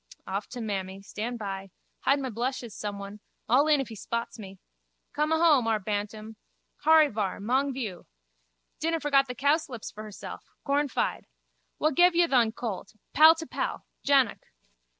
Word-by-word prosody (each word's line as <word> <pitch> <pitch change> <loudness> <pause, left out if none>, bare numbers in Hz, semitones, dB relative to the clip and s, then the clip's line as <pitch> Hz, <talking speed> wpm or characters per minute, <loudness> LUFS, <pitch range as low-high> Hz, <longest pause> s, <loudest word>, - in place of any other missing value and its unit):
Off 195 +2 -3
to 250 - -8
mammy. 195 -3 -3
Stand 230 +4 -4
by. 195 -2 -5 0.3
Hide 280 +1 +2
my 260 -2 -3
blushes 240 0 -3
someone. 200 0 -6 0.3
All 270 +6 +4
in 300 -2 +4
if 270 - -3
he 225 - -8
spots 235 +3 -4
me. 195 -2 -9 0.6
Come 300 +1 0
ahome, 320 -7 +4
our 225 -1 +3
Bantam. 210 +2 -4 0.5
Horryvar, 295 -11 +4
mong 260 +7 +1
vioo. 220 -9 -5 0.7
Dinna 330 +1 0
forget 275 -2 +3
the 250 - -5
cowslips 280 -3 0
for 210 - -9
hersel. 215 -2 -8 0.3
Cornfide. 285 -1 0 0.5
Wha 310 - +2
gev 350 +4 +5
ye 345 0 +5
thon 245 -8 +3
colt? 220 -4 -6 0.2
Pal 315 +2 +8
to 325 0 -6
pal. - - -4 0.2
Jannock. 275 -5 +3
245 Hz, 150 wpm, -28 LUFS, 210-285 Hz, 0.7 s, Pal